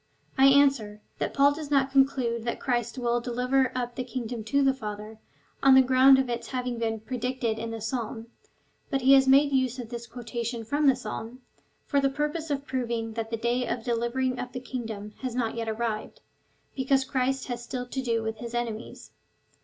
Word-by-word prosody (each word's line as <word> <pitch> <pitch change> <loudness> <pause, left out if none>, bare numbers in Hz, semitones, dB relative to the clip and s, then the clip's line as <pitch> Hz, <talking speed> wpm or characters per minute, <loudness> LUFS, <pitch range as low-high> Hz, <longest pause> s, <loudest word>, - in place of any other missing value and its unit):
I 270 0 +6
answer, 270 -7 +4 0.2
that - - -1
Paul 280 +1 +4
does 300 -1 -7
not 275 -2 +2
conclude 265 -4 +2
that 235 - -3
Christ 240 -1 -1
will 240 -1 0
deliver 250 +2 +1
up 245 -1 -2
the 255 - -3
kingdom 240 -2 -5
to 280 +5 +2
the 270 0 +4
Father, 215 -2 -7 0.4
on 270 -1 +7
the 265 - +8
ground 260 +1 +6
of 265 -1 +1
its 235 -1 -3
having 250 -2 -3
been 225 -1 -1
so - - -30
predicted 245 -2 -2
in 230 0 -4
the 225 -1 -6
Psalm, 225 -1 -3 0.6
but 275 -3 0
he 265 +2 +6
has 270 -1 +6
made 280 +2 +5
use 260 -2 +1
of 240 -3 -7
this 235 -1 -6
quotation 235 -1 -5
from 290 +5 +1
the 270 - +6
Psalm, 235 +1 -7 0.4
for 280 -2 +1
the 275 - +3
pur 295 +2 -1
pose 325 -1 -5
of 280 -1 -2
proving 235 -4 -2
that 225 0 -4
the 230 - -2
day 240 +2 0
of 235 -1 -3
delivering 245 +2 -1
up 250 -1 -5
the 255 - -4
kingdom 225 -5 -6
had 255 -3 -4
not 235 -3 0
yet 230 -1 -3
arrived, 220 -1 -3 0.5
because 270 0 +2
Christ 265 0 -1
has 240 -2 -4
still 250 +1 -4
to 265 +2 -4
do 230 -3 0
with 220 0 -3
his 235 +1 -7
enemies. 235 -2 -5
245 Hz, 205 wpm, -27 LUFS, 230-265 Hz, 0.6 s, the